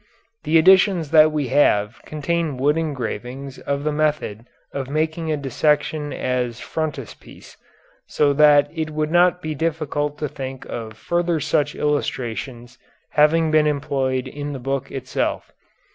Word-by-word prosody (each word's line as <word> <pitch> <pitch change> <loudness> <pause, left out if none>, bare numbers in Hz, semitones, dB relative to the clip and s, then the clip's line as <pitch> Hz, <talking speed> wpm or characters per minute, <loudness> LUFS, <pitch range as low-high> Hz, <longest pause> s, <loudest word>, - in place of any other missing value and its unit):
The 155 +2 +4
editions 185 -2 +4
that 155 -1 +6
we 150 -4 -2
have 120 -5 +2
contain 155 -1 -2
wood 145 +3 +2
engravings 135 -3 -4
of 140 0 -3
the 150 - 0
method 150 -7 -1 0.3
of 135 -2 -4
making 160 +2 -1
a 155 - 0
dissection 150 +2 0
as 125 -2 -2
frontispiece, 150 -7 -6 0.5
so 145 -1 +2
that 145 0 +6
it 160 -2 -3
would 155 0 -2
not 180 +1 +3
be 155 0 -3
difficult 150 -2 -2
to 150 - -2
think 130 -1 -7
of 110 -2 -6
further 170 +5 0
such 145 0 0
illustrations 125 -4 -3 0.3
having 155 +1 +3
been 155 -1 +4
employed 135 -3 -1
in 145 +1 -6
the 135 - -6
book 135 +1 -3
itself. 130 -1 -3
145 Hz, 140 wpm, -21 LUFS, 135-155 Hz, 0.5 s, that